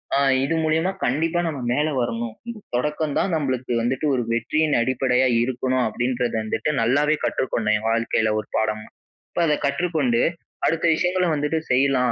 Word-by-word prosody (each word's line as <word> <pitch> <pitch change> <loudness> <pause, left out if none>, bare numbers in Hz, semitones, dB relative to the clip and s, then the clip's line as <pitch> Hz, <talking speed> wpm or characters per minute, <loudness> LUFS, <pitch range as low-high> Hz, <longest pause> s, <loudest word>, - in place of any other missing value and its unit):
அ - - +3 0.3
இது 165 +4 0
மூலியமா 160 +4 +1
கண்டிப்பா 160 +7 +1
நம்ம 150 -4 -3
மேலே 150 +4 +1
வரணும். 115 -1 -3 0.2
ம். 225 -2 -7 0.2
தொடக்கம் 150 +3 -1
தான் 185 - 0
நம்மளுக்கு 130 -5 -2
வந்துட்டு 130 +6 -1
ஒரு 125 - 0
வெற்றியின் 155 +6 +1
அடிப்படையா 130 +1 +2 0.2
இருக்கணும் 130 0 0
அப்பிடின்றத 120 +2 -1
வந்துட்டு 110 +7 -1
நல்லாவே 145 +6 +3
கற்றுக்கொண்டேன் 110 -4 0
என் 110 - -4
வாழ்க்கையில 115 -1 +1
ஒரு 105 - -7
பாடமா. 110 0 -1 0.5
இப்ப - - -1
அத 150 -1 +2
கற்றுக்கொண்டு 140 -5 0 0.5
அடுத்த 165 +1 0
விஷயங்களை 180 +2 +1
வந்துட்டு 150 +2 0
செய்யலாம், 130 -1 +3
130 Hz, 155 wpm, -23 LUFS, 120-155 Hz, 0.5 s, அ